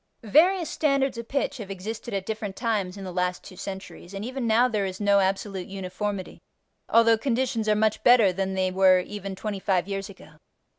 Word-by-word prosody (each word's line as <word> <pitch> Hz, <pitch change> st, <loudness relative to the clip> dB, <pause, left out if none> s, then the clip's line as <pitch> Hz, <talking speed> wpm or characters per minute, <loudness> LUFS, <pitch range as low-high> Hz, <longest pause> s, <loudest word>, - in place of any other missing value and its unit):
Various 335 Hz, -, +4 dB
standards 275 Hz, -5 st, +1 dB
of 235 Hz, -, -7 dB
pitch 275 Hz, 0 st, -1 dB
have 210 Hz, -5 st, -8 dB
existed 210 Hz, +5 st, -6 dB
at 195 Hz, -1 st, -3 dB
different 210 Hz, -2 st, -4 dB
times 205 Hz, -5 st, -1 dB
in 195 Hz, -, -7 dB
the 185 Hz, -, -6 dB
last 180 Hz, 0 st, -1 dB
two 185 Hz, -, -12 dB
centuries, 190 Hz, -1 st, -8 dB
and 195 Hz, +2 st, -4 dB
even 255 Hz, -1 st, -3 dB
now 230 Hz, +3 st, +4 dB
there 210 Hz, -5 st, -1 dB
is 185 Hz, 0 st, -6 dB
no 200 Hz, -1 st, +4 dB
absolute 195 Hz, -1 st, -1 dB
uniformity 195 Hz, 0 st, -5 dB, 0.5 s
although 230 Hz, -1 st, +5 dB
conditions 235 Hz, -3 st, 0 dB
are 210 Hz, -, +4 dB
much 215 Hz, 0 st, +1 dB
better 230 Hz, -6 st, +6 dB
than 190 Hz, +1 st, -2 dB
they 185 Hz, -1 st, 0 dB
were 185 Hz, 0 st, +5 dB
even 195 Hz, 0 st, -6 dB
twenty 205 Hz, 0 st, -4 dB
five 190 Hz, -1 st, 0 dB
years 195 Hz, 0 st, -4 dB
ago. 195 Hz, -, -15 dB
205 Hz, 195 wpm, -26 LUFS, 190-230 Hz, 0.5 s, better